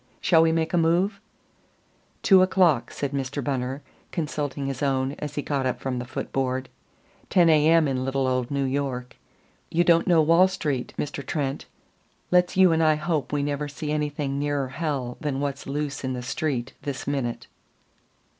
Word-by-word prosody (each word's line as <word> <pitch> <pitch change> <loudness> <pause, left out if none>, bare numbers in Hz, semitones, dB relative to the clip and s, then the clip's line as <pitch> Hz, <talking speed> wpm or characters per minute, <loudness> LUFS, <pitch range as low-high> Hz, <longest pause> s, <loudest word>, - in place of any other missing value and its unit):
Shall 165 -2 +4
we 165 0 +4
make 160 +2 0
a 175 - +4
move?" 180 +5 +1 1.0
"Two 190 -2 +7
o'clock," 180 -10 +3
said 140 -2 -4
Mr. 140 0 -3
Bunner, 135 0 -2 0.3
consulting 145 -4 -3
his 135 -2 -4
own 135 -1 +1
as 150 -1 -5
he 145 - -2
got 135 -3 -1
up 130 - -2
from 130 -2 -3
the 125 - -5
foot 125 - -6
board. 130 -1 -1 0.6
"Ten 175 -3 +5
A. 155 -1 +4
M. 165 -2 +5
in 130 -2 -1
little 135 0 0
old 130 -1 0
New 140 -1 -1
York. 130 -2 -2 0.5
You 170 +2 +2
don't 170 0 +4
know 170 -3 +5
Wall 165 +4 +5
Street, 150 -9 -3
Mr. 145 -1 -4
Trent. 140 -1 -3 0.6
Let's 180 0 +3
you 190 -2 +6
and 160 0 +2
I 155 -1 +4
hope 155 -3 -2
we 145 -1 0
never 145 0 -2
see 150 +1 -5
anything 145 -2 -2
nearer 145 -2 -1
hell 135 -4 -3
than 145 -4 -2
what's 140 -1 -3
loose 145 0 -3
in 130 0 -2
the 125 -1 -5
Street 130 -2 -2
this 140 -2 -5
minute." 135 -5 -2
145 Hz, 180 wpm, -25 LUFS, 135-160 Hz, 1.0 s, Two